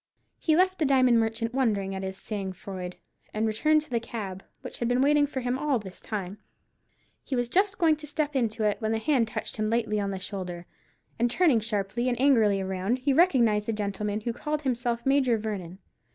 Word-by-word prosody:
He 315 - +2
left 370 +2 +2
the 310 - +2
diamond 255 -4 +4
merchant 225 +1 -1
wondering 210 -7 0
at 190 - -4
his 190 0 -5
sang 195 -3 -4
froid, 180 -1 -7 0.4
and 215 +1 +1
returned 305 +8 +3
to - - -19
the 235 - +1
cab, 200 -5 -6 0.2
which - - -8
had 235 - 0
been 245 +1 +2
waiting 290 +2 +4
for 265 -2 -4
him 250 +1 -1
all 295 -3 +1
this 190 -4 -9
time. 200 -1 -5 0.8
He 270 - -3
was 245 -1 0
just 385 - +2
going 320 -4 +3
to 300 0 -9
step 295 0 -2
into 225 -3 0
it, 210 -1 +2
when 220 0 0
a - - +1
hand 250 -1 +2
touched 220 - -5
him 215 0 0
lightly 220 -2 0
on 200 -1 -1
the 195 - -3
shoulder, 185 -3 -6 0.5
and 240 +1 +3
turning 295 -3 +3
sharply 215 +2 -1
and 240 -1 -2
angrily 220 -8 +4
round, 190 +5 -1
he 270 +2 +1
recognized 240 - +3
the 225 - 0
gentleman 210 0 -2
who 235 +2 -2
called 300 +4 -3
himself 240 -2 -1
Major 270 -4 +3
Vernon. 195 -5 -5
230 Hz, 210 wpm, -27 LUFS, 205-270 Hz, 0.8 s, diamond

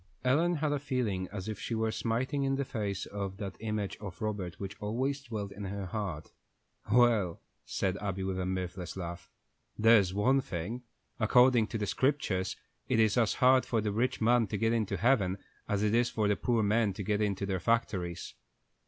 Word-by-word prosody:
Ellen 165 +7 +3
had 150 -1 0
a 145 - 0
feeling 115 -9 -1
as 100 -1 -5
if 110 -1 -4
she 115 - -3
were 110 0 0
smiting 125 +6 -1
in 135 0 +1
the 140 0 -1
face 100 -6 -3
that 100 -1 -4
image 105 -2 -3
of 100 -4 -8
Robert 105 -5 -3
which 100 0 -5
always 130 +7 -1
dwelt 110 -6 -5
in 100 0 -7
her 100 0 -4
heart. 95 -6 -4 0.6
"Well," 110 -7 +4 0.3
said 95 0 -1
Abby, 95 -2 -3
with 95 -1 -2
a 90 - -1
mirthless 90 -1 -4
laugh, 85 -1 -6 0.5
"there's 110 -4 +5
one 125 +8 +3
thing: 105 +3 -4 0.4
according 125 0 +5
to 110 - -3
the 105 - -1
Scriptures, 120 -4 0 0.3
it - - +2
is 110 -2 +4
as 115 -4 +2
hard 130 0 +5
for 115 - 0
the 105 -1 -1
rich 125 +5 0
man 115 0 +3
to 105 - -3
get 115 +2 +2
into 110 -4 0
heaven 100 -3 +2 0.3
as 105 0 +1
it 105 0 +2
is 120 +1 +3
for 110 -2 0
the 105 - +3
poor 115 +1 +1
men 105 0 +2
to 100 - -5
get 105 +2 0
into 100 -2 0
their 95 -1 -1
factories." 90 -5 -1
105 Hz, 190 wpm, -31 LUFS, 95-120 Hz, 0.6 s, there's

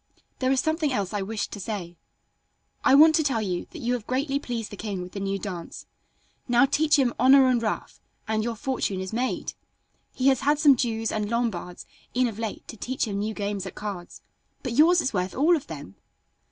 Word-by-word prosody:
There 255 0 +1
is 265 - +3
something 315 0 0
else 200 -6 -2
I 205 - -1
wished 210 +2 -3
to 205 - -7
say. 185 -4 -5 0.9
I 270 -1 +6
want 315 +2 +8
to 315 - +3
tell 265 -6 +1
you 180 -3 -3
that - - -10
you 240 +1 +1
have 240 -4 -4
greatly 275 +2 0
pleased 235 -5 -5
the - - -6
king 200 -3 -4
with 180 - -9
the 200 - -6
new 195 0 -1
dance. 185 -4 -7 0.6
Now 245 +2 +5
teach 300 +2 +3
him 255 -4 +2
'honor 265 +1 +7
and 250 -2 +2
ruff' 220 - -4 0.3
and 215 0 0
your 235 0 -2
fortune 215 -5 -2
is 190 +2 -5
made. 250 +3 -2 0.6
He 260 +1 +2
has 265 -2 +3
had 290 +2 +2
some 290 -2 +6
Jews 225 -2 -1
and 210 -1 -2
Lombards 220 -7 -2 0.3
in 255 0 +3
of 220 -2 -6
late 225 -2 -5
to 225 - -8
teach 255 +5 -2
him 200 -1 -3
new 215 +1 -2
games 200 -2 -3
at 190 - -9
cards, 200 -4 -7 0.4
but 250 -4 -3
yours 335 +6 +5
is 260 - -2
worth 180 -1 -2
all 315 +6 +4
of 300 - -5
them." 145 - -8
230 Hz, 215 wpm, -26 LUFS, 200-270 Hz, 0.9 s, want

